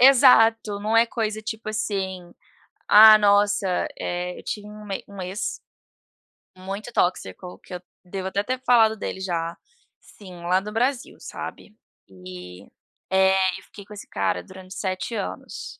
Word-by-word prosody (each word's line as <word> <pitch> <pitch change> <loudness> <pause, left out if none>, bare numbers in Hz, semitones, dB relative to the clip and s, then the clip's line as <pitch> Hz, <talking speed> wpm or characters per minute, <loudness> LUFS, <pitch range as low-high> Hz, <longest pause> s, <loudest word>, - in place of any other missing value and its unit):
Exato. 225 -5 +6
Não 215 +2 0
é 230 - +7
coisa, 220 -2 -3
tipo 220 0 -6
assim, 190 -4 -3 0.6
ah, 215 +1 +10
nossa, 205 -1 +3 0.3
eh, 180 0 -4
eu - - -19
tinha 210 -1 -5
uma 210 -2 -7
um 200 -1 -9
ex 185 +4 -3 1.1
muito 195 +5 -6
tóxico, 180 -1 -2
que - - -13
eu 180 - -7 0.2
devo 190 +1 -5
até 200 +1 -1
ter 255 +4 -3
falado 225 -3 +5
dele 195 - -5
já 170 -3 -2 0.5
sim, 185 -4 -13
lá 180 +2 +2
do 210 +2 -7
Brasil, 250 +3 -1
sabe. 210 - -8 0.3
E, 90 -1 -11 0.5
eh, 190 0 +3
eu - - -18
fiquei 200 -2 -13
com 210 - -12
esse 205 - -10
cara 95 -2 -1
durante 185 0 -12
7 190 +4 -3
anos. 200 - -6
200 Hz, 150 wpm, -24 LUFS, 185-215 Hz, 1.1 s, ah